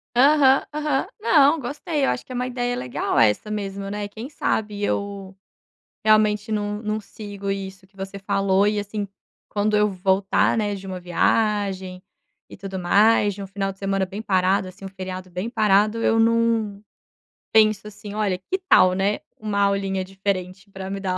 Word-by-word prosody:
Aham, 275 0 +5
aham. 300 -3 0
Não, 295 -4 +5
gostei, 290 +3 -3
eu - - +1
acho - - -2
que - - -13
é - - -5
uma 250 +1 -1
ideia 245 -1 -2
legal 125 - -2
essa 115 - +2
mesmo, 200 -1 -4
né, 205 0 -4
quem 220 +4 -8
sabe 210 -7 -2
eu 200 -1 -3 0.7
realmente 215 0 +3
não 210 0 -2
não 215 0 -2
sigo 200 -1 -6
isso 190 -1 -6
que 195 +1 -31
você 195 +1 -6
falou 195 0 +1
e 210 0 +1
assim, 205 0 -4 0.4
quando 210 +1 0
eu 210 0 +3
voltar, 190 +3 +1
né, 205 -2 0
de 195 0 -9
uma 185 -1 -5
viagem 190 0 0 0.5
e - - -10
tudo 195 -1 -6
mais, 205 +3 +4
de 200 +1 -7
um - - -7
final 195 0 -3
de 195 - -28
semana 195 -1 0
bem 200 +3 -7
parado, 190 -1 +1
assim, 185 +1 -12
um - - -4
feriado 185 -1 -7
bem 180 +6 -4
parado 210 -1 +3
eu 225 - +2
não 225 -3 +2 0.7
penso, 215 -2 +4
assim: 205 0 -9
"Olha, 205 -4 0
que 365 - -3
tal, 185 0 +6
né, 195 +2 0 0.2
uma 210 -2 -2
aulinha 195 -1 +1
diferente 190 0 -4
para 190 0 -7
me 195 0 -4
dar 185 -1 -1
200 Hz, 180 wpm, -23 LUFS, 195-215 Hz, 0.7 s, tal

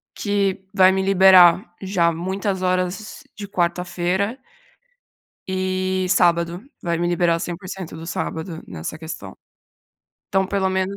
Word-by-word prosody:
que 200 -2 -1
vai 190 -2 +6
me 190 0 0
liberar 190 -2 +6
já 185 -3 +1
muitas 190 +3 -3
horas 185 +3 -2
de 205 - -7
quarta-feira 180 +4 -1 1.1
e 185 0 -1
sábado, 175 0 +2 0.2
vai 170 -1 0
me 175 +1 0
liberar 175 -1 +2
o - - -7
100% 180 +1 -6
do 160 0 -8
sábado 165 -1 -4
nessa 80 - -6
questão. 160 - -8 0.9
Então 190 0 +1
pelo 195 -1 0
menos 190 +1 -1
185 Hz, 125 wpm, -21 LUFS, 175-190 Hz, 1.1 s, vai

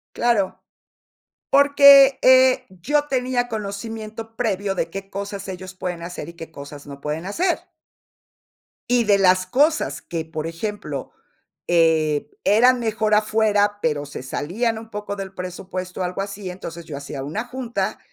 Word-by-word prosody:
Claro, 230 -5 +1 0.9
porque, 280 -1 +7
eh, 260 0 +6
yo 290 - -1
tenía 250 -2 0
conocimiento 220 +1 -6
previo 200 -4 -1
de 170 -2 -1
qué 195 +2 -7
cosas 200 0 -5
ellos 185 0 -7
pueden 180 -2 -4
hacer, 170 -2 -6
y 170 - -12
qué 165 -1 -9
cosas 145 0 -10
no 140 0 -10
pueden 150 +4 -4
hacer. 345 - 0 1.3
Y 245 -1 +4
de 205 -1 +4
las 185 -1 +3
cosas 295 - +1
que, 165 -2 -4
por 160 -1 -5
ejemplo, 205 - -5 0.6
eh, 160 -3 +2
eran 245 +4 +5
mejor 220 -2 +1
afuera, 210 -1 +2
pero 150 -4 0
se 145 - -8
salían 215 - -2
un 225 0 -10
poco 210 -1 -5
del 195 -1 -7
presupuesto, 185 0 -5
algo 180 +2 -3
así, 200 -1 -6
entonces 170 -2 -8
yo 150 - -7
hacía 140 -1 -6
una 200 - -4
junta, 245 -1 -3
200 Hz, 145 wpm, -22 LUFS, 175-230 Hz, 1.3 s, porque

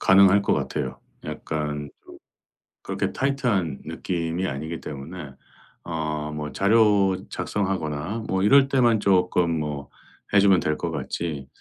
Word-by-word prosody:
가능할 100 +1 +6
것 - - +1
같아요. 65 0 -3 0.3
약간 75 -2 -4
좀 - - -14 0.7
그렇게 - - -2
타이트한 120 - 0
느낌이 85 +1 -2
아니기 80 +3 -4
때문에 75 +1 -8 0.5
어 75 -2 -3
뭐 75 0 -5
자료 100 -2 +4
작성하거나 95 +1 -2
뭐 95 0 0
이럴 135 +6 +6
때만 120 -5 +3
쪼끔 90 -4 +2
뭐 70 -2 -4 0.5
해 100 - +7
주면 95 -2 +5
될 75 -1 0
것 - - -3
같지. 75 -5 -4
90 Hz, 260 characters per minute, -24 LUFS, 75-100 Hz, 0.7 s, 해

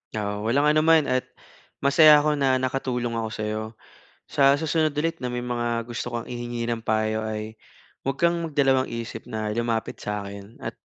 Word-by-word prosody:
Oo, 105 0 -2
walang 145 +5 +3
ano 155 - +3
man 160 -1 +6
at 130 -2 -1 0.6
masaya 150 +1 +7
ako 150 -1 +1
na 135 -2 +3
nakatulong 130 -2 -1
ako 110 -1 -3
sayo. 110 0 -3 0.7
Sa 140 0 +5
susunod 155 +1 +1
ulit 165 +3 -1
na 125 -3 -4
may 125 - -2
mga 120 -1 -1
gusto 120 0 -4
kang 120 -1 -4
ihingi 120 -1 -4
ng 115 -1 -3
payo 110 0 0
ay 110 0 -5 0.5
huwag 135 0 -1
kang 170 0 +3
magdalawang-isip 130 -6 0
na 110 -1 -3
lumapit 115 0 -2
sa 105 0 -4
akin 100 +2 -10
at - - -6
120 Hz, 170 wpm, -25 LUFS, 110-140 Hz, 0.7 s, masaya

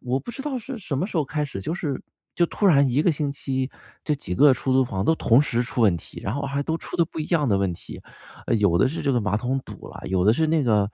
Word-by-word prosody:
我 125 +2 -1
不 140 - -8
知 240 +3 -7
道 280 -3 -2
是 245 +1 -7
什 160 -9 -4
么 180 - 0
时 210 - -6
候 155 - +2
开 150 +2 -2
始， 135 -9 -6
就 160 - -3
是 145 -8 -3 0.3
就 170 - +3
突 205 - 0
然 140 -6 +5
一 135 +5 +2
个 175 - +4
星 145 -1 -2
期， 135 -1 -3 0.3
就 150 - +1
几 110 -10 -5
个 145 +6 +6
出 130 - -2
租 130 0 +4
房 95 -5 -3
都 160 - +4
同 120 -4 +4
时 120 -5 0
出 125 - -4
问 100 -7 +4
题， - - -10
然 105 - -2
后 145 - -3
还 140 +1 -2
都 160 +2 -1
出 - - -7
的 170 - +4
不 160 - -9
一 150 - -2
样 155 -6 +1
的 100 -3 +2
问 95 -2 0
题。 85 - -10 0.6
有 95 -5 +3
的 100 - +4
是 155 - -4
这 140 - +1
个 120 - +2
马 105 -1 0
桶 125 +5 -1
堵 - - -10
了， - - -10
有 95 -1 +1
的 110 - +6
是 160 +7 +1
那 160 -1 +2
个， 105 -4 +2
135 Hz, 320 characters per minute, -24 LUFS, 115-155 Hz, 0.6 s, 个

